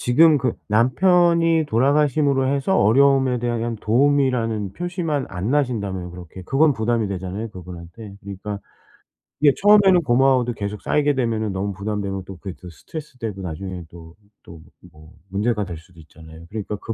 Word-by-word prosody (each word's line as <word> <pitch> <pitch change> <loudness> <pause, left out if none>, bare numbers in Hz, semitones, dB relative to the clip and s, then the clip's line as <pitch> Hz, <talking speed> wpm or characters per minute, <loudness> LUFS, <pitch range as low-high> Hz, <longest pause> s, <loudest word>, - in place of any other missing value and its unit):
지금 150 +5 +5
그 125 -3 0 0.2
남편이 165 - +3
돌아가심으로 140 +2 +2
해서 140 +8 +1
어려움에 130 +2 +4
대한 120 -1 -1
그냥 115 0 -3
도움이라는 120 -5 +1
표시만 170 -6 -2
안 95 +4 -4
나신다면 100 -11 -1
그렇게 90 +1 -10
그건 140 - +3
부담이 115 -2 -1
되잖아요 95 +3 -5
그분한테. 90 +3 -10
그러니까 100 +1 -6 0.9
예 145 -2 +6
처음에는 200 -4 +6
고마워도 130 -2 +2
계속 100 -1 -5
쌓이게 145 -1 +1
되면은 115 -4 -1
너무 100 +1 -3
부담되면 100 -1 -4
또 95 -2 -10
그게 95 0 -8
또 90 - -9
스트레스 150 - -10
되고 105 -5 -5
나중에는 90 0 -6
또, 80 0 -14 0.3
또 80 -2 -13 0.3
뭐 75 +2 -17 0.2
문제가 105 +2 -1
될 85 -3 -7
수도 80 +1 -18
있잖아요. 80 +1 -14
그러니까 105 -1 -5
그 115 - -4
115 Hz, 390 characters per minute, -21 LUFS, 95-140 Hz, 0.9 s, 예